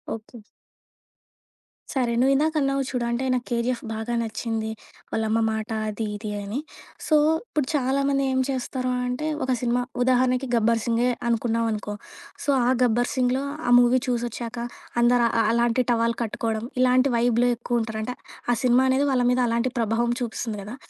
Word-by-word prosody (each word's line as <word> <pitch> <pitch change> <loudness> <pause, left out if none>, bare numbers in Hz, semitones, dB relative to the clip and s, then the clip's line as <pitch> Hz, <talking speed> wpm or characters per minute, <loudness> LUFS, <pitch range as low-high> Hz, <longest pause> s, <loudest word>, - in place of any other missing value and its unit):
Okay. 225 +2 -12 1.6
సరే! 250 -4 0
నువ్వు 265 +2 +4
ఇందాక 310 +3 +1
అన్నావు 275 0 +1
చూడు. 250 -2 -2
అంటే 235 +2 -1
నాకు 250 -1 -1
కేజీఎఫ్ 240 0 -1
బాగా 220 +2 -3
నచ్చింది. 225 -1 -3 0.4
వాళ్ళ 220 - 0
అమ్మ 225 +1 +2
మాట 220 0 -3 0.2
అది 215 +1 -3
ఇది 210 0 -5
అని. 205 +6 -4 0.5
సో 310 - +4 0.3
ఇప్పుడు 295 - -1
చాలామంది 275 +1 +1
ఏం 260 - +1
చేస్తారు 255 -1 -2 0.2
అంటే 250 +5 -2 0.2
ఒక 260 - -1
సినిమా 245 0 +1 0.2
ఉదాహరణకి 255 +1 +2
గబ్బర్ 230 0 +2
సింగే 235 +1 +2 0.2
అనుకున్నాం 230 0 +1
అనుకో. 210 -1 -4 0.5
సో - - -3 0.2
ఆ - - +4
గబ్బర్ 245 0 +2
సింగ్‌లో 255 +1 +1 0.2
ఆ - - +2
మూవీ 245 +1 +4
చూసొచ్చాక 240 -1 -3 0.4
అందరు 240 0 +4 0.2
అ - - +5
అలాంటి 235 +1 +2
టవల్ 230 0 +1
కట్టుకోవడం 225 0 -2 0.2
ఇలాంటివి 255 +1 +4
వైబ్‌లో 240 +1 +3
ఎక్కువ 240 0 -1
ఉంటారంటే 220 +2 -4 0.4
ఆ - - +1
సినిమా 250 +1 +4
అనేది 265 +2 +2
వాళ్ళ 250 -2 +2
మీద 250 - +1
అలాంటి 235 +2 0
ప్రభావం 230 +1 +1
చూపిస్తుంది 225 -2 -3
కదా! 210 +5 -7
240 Hz, 160 wpm, -24 LUFS, 230-255 Hz, 1.6 s, అ